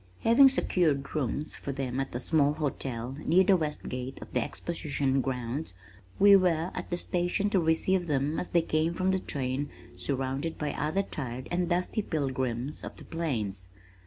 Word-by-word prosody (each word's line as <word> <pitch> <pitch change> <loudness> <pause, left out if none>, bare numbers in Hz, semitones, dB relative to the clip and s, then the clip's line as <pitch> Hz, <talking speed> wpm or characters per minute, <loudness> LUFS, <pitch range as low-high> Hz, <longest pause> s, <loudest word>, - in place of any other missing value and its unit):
Having 255 +4 +7
secured 155 - +1
rooms 150 +1 -1
for 140 - -5
them 130 -1 -3
at 135 -2 -3
a - - -1
small 145 +1 +3
hotel 135 -5 -3
near 180 +4 +5
the 195 0 +5
west 155 -4 -2
gate 125 +1 -5
of - - -11
the - - +2
exposition 140 -5 -1
grounds, 125 - -3 0.4
we 200 0 +8
were 180 -2 +2
at - - -5
the 175 - -1
station 180 +4 0
to 195 - +4
receive 175 +2 +2
them 145 +1 0
as - - -3
they 170 -1 +3
came 160 +1 0
from 185 +1 +1
the 190 - +1
train 140 -3 -2 0.3
surrounded 135 +3 -2
by 150 -2 -2
other 155 +7 0
tired 130 -7 -5
and 175 0 0
dusty 180 +4 0
pilgrims 130 - -2
of - - -7
the - - -12
plains. 110 - -2
150 Hz, 175 wpm, -29 LUFS, 130-175 Hz, 0.4 s, we